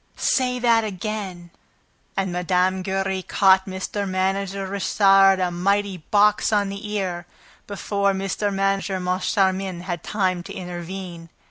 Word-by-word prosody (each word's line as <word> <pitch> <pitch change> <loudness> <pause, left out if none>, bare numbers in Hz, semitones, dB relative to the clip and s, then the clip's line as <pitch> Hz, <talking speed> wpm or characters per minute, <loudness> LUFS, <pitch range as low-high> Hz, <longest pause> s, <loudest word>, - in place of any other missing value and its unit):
"Say 250 -1 +1
that 235 -2 +3
again!" 190 -4 -5 0.7
And 190 -1 0
Mme. 180 +1 +1
Giry 190 0 -2
caught 190 0 +3
Mr. 190 +1 -4
Manager 195 +1 -1
Richard 195 0 +4
a 180 -1 0
mighty 195 +2 0
box 205 +6 +2
on 205 -2 +2
the 200 +2 -6
ear, 180 -4 -3 0.4
before 200 0 0
Mr. 195 +2 -2
Manager 195 0 0
Moncharmin 185 0 0
had 175 -2 -4
time 185 -4 -1
to - - -9
intervene. 175 -1 -7
195 Hz, 125 wpm, -23 LUFS, 185-200 Hz, 0.7 s, Richard